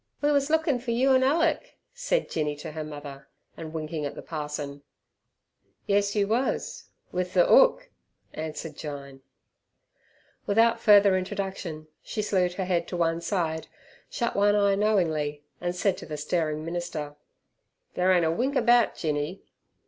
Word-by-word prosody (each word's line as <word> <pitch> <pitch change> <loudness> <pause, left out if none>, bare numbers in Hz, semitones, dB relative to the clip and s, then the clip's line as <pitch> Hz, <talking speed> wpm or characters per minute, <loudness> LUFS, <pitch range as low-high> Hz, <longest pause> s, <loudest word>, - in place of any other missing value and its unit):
"We 290 0 +2
wus 280 0 +2
lookin' 315 -4 +2
fer 240 0 -7
you 250 +4 +3
an' 260 - +4
Alick," 330 - +1 0.2
said - - -1
Jinny 150 -2 -2
to 145 - -8
her 155 0 -5
mother, 145 -2 -9 0.3
and 160 -1 -8
winking 155 -1 -4
at 145 - -4
the - - -8
parson. 150 -2 -5 1.0
"Yes, 200 0 +1
you 200 -1 +2
wus 240 +5 -1 0.3
with 180 0 -2
ther - - +5
'ook," - - +5 0.4
answered 155 0 -6
Jyne. 140 -3 -8 1.3
Without 230 +3 +3
further 205 -3 +6
introduction 185 -4 -4
she 215 - -4
slewed 185 -3 +1
her 190 +1 -3
head 175 -2 0
to 180 - -4
one 165 0 +1
side, 165 -3 -2 0.4
shut 235 -1 -2
one 205 +1 +4
eye 200 -1 +3
knowingly, 160 -8 0 0.2
and 175 0 -2
said 190 +1 +1
to - - -10
the 150 - -5
staring 155 -2 -1
minister, 165 -4 -4 0.8
"Ther 185 +1 +2
ain't 175 -2 +4
a 160 - +2
wink 255 +11 -1
about 240 -3 +4
Jinny." 150 +3 -3
180 Hz, 155 wpm, -27 LUFS, 155-225 Hz, 1.3 s, further